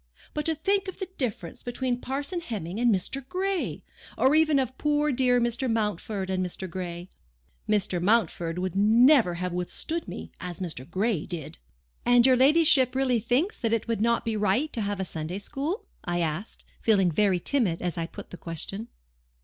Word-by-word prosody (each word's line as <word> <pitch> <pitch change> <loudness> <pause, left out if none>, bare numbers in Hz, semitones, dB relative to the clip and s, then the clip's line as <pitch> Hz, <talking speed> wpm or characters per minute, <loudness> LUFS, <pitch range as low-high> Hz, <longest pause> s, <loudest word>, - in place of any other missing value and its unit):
But 300 +1 -2
to 320 - +1
think 390 +5 0
of 375 - -6
the 380 -2 -5
difference 215 - -3
between 245 0 -2
Parson 285 +7 -2
Hemming 205 - -5
and 240 -1 +4
Mr. 215 +8 -1
Gray! 380 0 -2 0.3
or 265 +2 +4
even 310 -2 +4
of 260 -1 -1
poor 295 0 +2
dear 250 -1 +3
Mr. 240 +1 0
Mountford 210 -3 -2
and 185 0 0
Mr. 185 +1 -4
Gray. 175 0 -5 0.6
Mr. 200 -4 +1
Mountford 180 -5 +1
would 185 0 -2
never 225 - +5
have 180 0 -3
withstood 180 - -3
me - - -7
as 180 -2 -6
Mr. 160 -7 -5
Gray 190 -1 0
did!" 160 -3 -5 0.4
"And 245 0 +5
your 260 -1 +6
ladyship 270 -1 +5
really 260 -3 +2
thinks 250 - 0
that 230 -2 0
it 230 - 0
would 230 -2 -1
not 235 +1 +2
be 225 -1 -1
right 210 +9 +1
to 230 - -2
have 205 -1 -2
a 190 - -1
Sunday 160 +2 -4
school?" 290 - -3 0.2
I 175 0 -1
asked, 165 +6 -4 0.2
feeling 195 -5 +3
very 190 +2 +2
timid 195 -6 +1
as 175 -1 -2
I 165 -1 -2
put - - -10
time 180 - -9
question. 175 +7 -5
225 Hz, 180 wpm, -27 LUFS, 180-265 Hz, 0.6 s, your